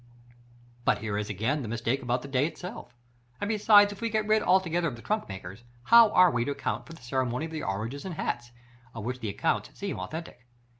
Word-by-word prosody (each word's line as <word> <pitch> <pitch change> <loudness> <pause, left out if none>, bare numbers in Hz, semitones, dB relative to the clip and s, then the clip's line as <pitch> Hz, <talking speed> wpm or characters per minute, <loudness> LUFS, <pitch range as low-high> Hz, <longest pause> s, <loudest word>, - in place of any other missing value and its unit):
But - - +3
here 105 -2 -4
is 105 0 -2
again 115 +9 -1
the 120 - -5
mistake 120 +4 -1
about 125 0 -1
the - - -7
day 135 +1 +1
itself; 170 -8 -9 0.4
and 205 - -2
besides 205 -1 +5
if 200 - -14
we 230 - 0
get 215 -1 0
rid 215 0 +3
altogether 175 -3 +2
of 130 - -4
the 115 - -12
trunkmakers, 95 - -4 0.2
how 230 - +8
are 180 0 +6
we 120 -2 0
to 140 - -2
account - - -3
for 165 - -10
the 160 - -14
ceremony 125 +2 -1
of 165 - -8
the 160 -1 -4
oranges 115 +8 -3
and 185 -3 -5
hats, 120 -4 -3 0.5
of 110 - -6
which 125 +3 -3
the 110 - -3
accounts 100 - -1
seem - - -4
authentic? 120 - -7
135 Hz, 215 wpm, -28 LUFS, 115-180 Hz, 0.5 s, how